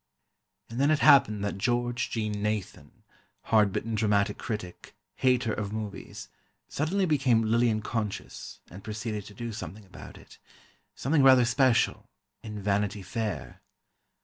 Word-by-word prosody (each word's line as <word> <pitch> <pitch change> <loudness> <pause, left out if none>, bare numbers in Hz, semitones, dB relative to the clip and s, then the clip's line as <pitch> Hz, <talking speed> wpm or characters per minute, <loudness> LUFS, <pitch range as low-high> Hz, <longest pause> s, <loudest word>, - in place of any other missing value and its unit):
And 115 +2 -6
then 140 +2 +3
it 155 - +4
happened 110 -9 +5
that 100 -1 -3
George 120 +2 0
Jean 105 -2 -3
Nathan, 105 -2 -4 0.4
hard 105 -3 +3
bitten 115 +4 -3
dramatic 105 -1 +1
critic, 105 -6 -6 0.2
hater 125 -3 +2
of 105 -2 -4
movies, 105 -2 -6 0.4
suddenly 185 +7 0
became 135 -8 +2
Lillian 110 -1 +2
conscious 110 -3 -5
and 95 +3 -11
proceeded 105 -1 -4
to 105 - -13
do 115 +1 -5
something 105 0 -8
about 95 - -12
it—something 145 +2 -5
rather 130 -2 +7
special—in 115 -4 -1
Vanity 100 0 0
Fair. 95 - -4
110 Hz, 125 wpm, -28 LUFS, 105-120 Hz, 0.4 s, rather